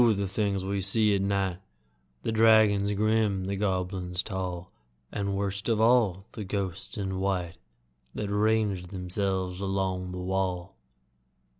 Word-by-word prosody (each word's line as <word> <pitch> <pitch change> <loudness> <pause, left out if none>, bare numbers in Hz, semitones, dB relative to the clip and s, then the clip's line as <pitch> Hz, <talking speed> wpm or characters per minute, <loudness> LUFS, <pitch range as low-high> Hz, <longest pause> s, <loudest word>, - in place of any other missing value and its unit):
the 100 0 -1
things 100 -1 -1
we 100 0 -1
see 105 +2 +3
at 100 - +1
night 95 -2 0 0.6
The - - -1
dragons 110 -2 +5
grim, 105 -2 +1
the 100 +1 -2
goblins 95 -2 -1
tall, 90 -3 -4 0.4
And, 100 -1 -2
worst 100 +2 -2
of 110 -2 +2
all, 110 -5 +3
the 110 - -6
ghosts 100 0 -4
in 95 -2 -2
white 95 -3 -1 0.6
That 105 - -3
range 105 -3 +1
themselves 95 0 -2
along 95 -2 -1
the 90 - -5
wall! 90 0 -2
95 Hz, 135 wpm, -28 LUFS, 95-105 Hz, 0.6 s, dragons